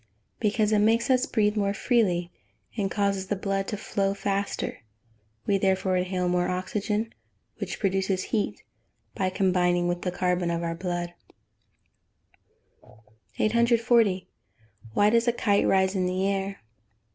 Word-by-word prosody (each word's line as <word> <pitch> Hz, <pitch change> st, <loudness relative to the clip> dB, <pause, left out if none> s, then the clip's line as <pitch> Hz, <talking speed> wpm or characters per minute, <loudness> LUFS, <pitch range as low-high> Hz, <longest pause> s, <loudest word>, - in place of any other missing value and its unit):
_ -, -, -39 dB, 0.4 s
Because 210 Hz, 0 st, +1 dB
it 210 Hz, -, +4 dB
makes 230 Hz, +4 st, +3 dB
us 255 Hz, +1 st, +3 dB
breathe 210 Hz, -2 st, +1 dB
more 200 Hz, -1 st, 0 dB
freely, 185 Hz, -8 st, +1 dB, 0.4 s
and 200 Hz, -4 st, -1 dB
causes 200 Hz, -1 st, 0 dB
the 205 Hz, -, 0 dB
blood 195 Hz, 0 st, -2 dB
to 210 Hz, -, -3 dB
flow 195 Hz, -1 st, -1 dB
faster; 200 Hz, 0 st, -2 dB, 0.7 s
we, 200 Hz, -1 st, +2 dB
therefore, 190 Hz, -1 st, +1 dB
inhale 180 Hz, 0 st, 0 dB
more 180 Hz, 0 st, +1 dB
oxygen, 210 Hz, +4 st, -2 dB, 0.5 s
which -, -, -4 dB
produces 190 Hz, -1 st, 0 dB
heat 215 Hz, -2 st, -1 dB, 0.5 s
by 190 Hz, -1 st, 0 dB
combining 180 Hz, -2 st, +2 dB
with 175 Hz, 0 st, -1 dB
the 180 Hz, -, -1 dB
carbon 180 Hz, -1 st, 0 dB
of 170 Hz, 0 st, -1 dB
our 165 Hz, 0 st, -1 dB
blood. 175 Hz, 0 st, -3 dB, 2.2 s
840. 230 Hz, -3 st, +3 dB, 0.7 s
_Why 205 Hz, +1 st, +4 dB
does 235 Hz, +1 st, +3 dB
a 240 Hz, -, +3 dB
kite 205 Hz, -4 st, +2 dB
rise 190 Hz, 0 st, +3 dB
in 185 Hz, -2 st, 0 dB
the 185 Hz, +1 st, -1 dB
air? 195 Hz, 0 st, -2 dB
195 Hz, 140 wpm, -26 LUFS, 185-210 Hz, 2.2 s, it